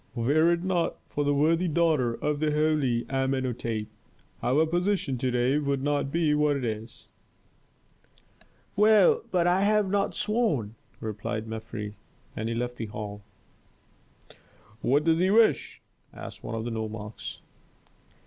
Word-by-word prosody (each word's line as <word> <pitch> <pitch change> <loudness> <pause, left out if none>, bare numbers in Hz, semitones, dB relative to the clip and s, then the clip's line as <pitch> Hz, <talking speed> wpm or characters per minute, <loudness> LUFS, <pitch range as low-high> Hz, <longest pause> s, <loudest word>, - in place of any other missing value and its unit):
Were 145 +8 +3
it 170 0 0
not 180 -3 0
for 145 - -1
the 145 - +1
worthy 165 +5 +2
daughter 155 -7 +2
of 150 +3 -2
the 155 0 +1
holy 150 -6 +1
Amenhôtep, 130 -5 -1 0.6
our 145 +6 +3
position 175 -3 0
to 130 - 0
day 125 +4 +2
would 140 -2 -1
not 145 -1 0
be 160 -2 +2
what 150 -1 +2
it 130 - -3
is." 110 0 -6 1.7
"Well, 220 - +5
but 175 -2 +1
I 180 +2 +3
have 205 -1 +2
not 200 -1 0
sworn," 185 - 0 0.3
replied 110 0 -4
Mefres, 110 -2 -6 0.4
and 110 +1 -3
he 115 - -2
left 120 +1 -3
the 115 - -4
hall. 105 -1 -7 1.6
"What 145 +4 +2
does 165 0 +3
he 185 +1 +3
wish?" 220 +2 +3 0.3
asked - - -10
one - - -4
of 110 0 -3
the 120 - -3
nomarchs. 110 -1 -6
145 Hz, 140 wpm, -27 LUFS, 115-170 Hz, 1.7 s, Well